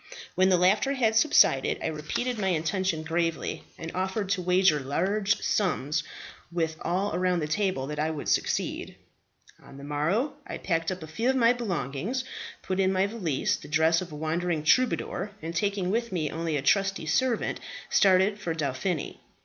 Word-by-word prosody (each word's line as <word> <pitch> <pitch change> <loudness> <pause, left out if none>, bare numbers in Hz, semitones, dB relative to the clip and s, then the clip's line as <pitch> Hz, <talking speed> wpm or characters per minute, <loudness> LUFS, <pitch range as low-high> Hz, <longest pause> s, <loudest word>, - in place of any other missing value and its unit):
When 185 +1 +3
the 185 - +5
laughter 200 +10 +3
had 230 -5 +1
subsided 220 - +4
I - - -5
repeated 215 +10 -2
my 195 - 0
intention 175 0 0
gravely, 165 0 -2
and 165 0 -6
offered 190 +2 -2
to 195 -2 +1
wager 180 -3 +3
large 190 +10 0
sums 155 -7 0 0.5
with 165 -2 -1
all 185 +3 -1
around 180 0 +1
the 150 - -2
table 185 -4 0
that 150 +1 -5
I 155 +1 +1
would 155 -2 -5
succeed. - - -1 0.7
"On 135 - -13
the 140 - -10
morrow 155 - 0
I - - -5
packed 165 -1 -1
up 185 -3 -5
a - - -8
few 225 +11 -1
of 265 - +2
my 240 -2 +5
belongings, 190 - -3 0.4
put 185 0 -2
in 190 0 +3
my 190 0 +2
valise 195 -10 -1
the - - -12
dress 160 +3 +3
of 180 -2 -7
a - - -7
wandering 160 +1 -1
troubadour, 210 -1 +1
and 165 +1 -6
taking 195 0 0
with 235 +1 -1
me 160 -5 -1
only 165 -2 -2
a 135 - -3
trusty 195 +2 +2
servant, 235 +10 0 0.3
started 195 +2 +4
for 170 -5 -3
Dauphiny. 155 +3 -2
180 Hz, 175 wpm, -27 LUFS, 155-200 Hz, 0.7 s, the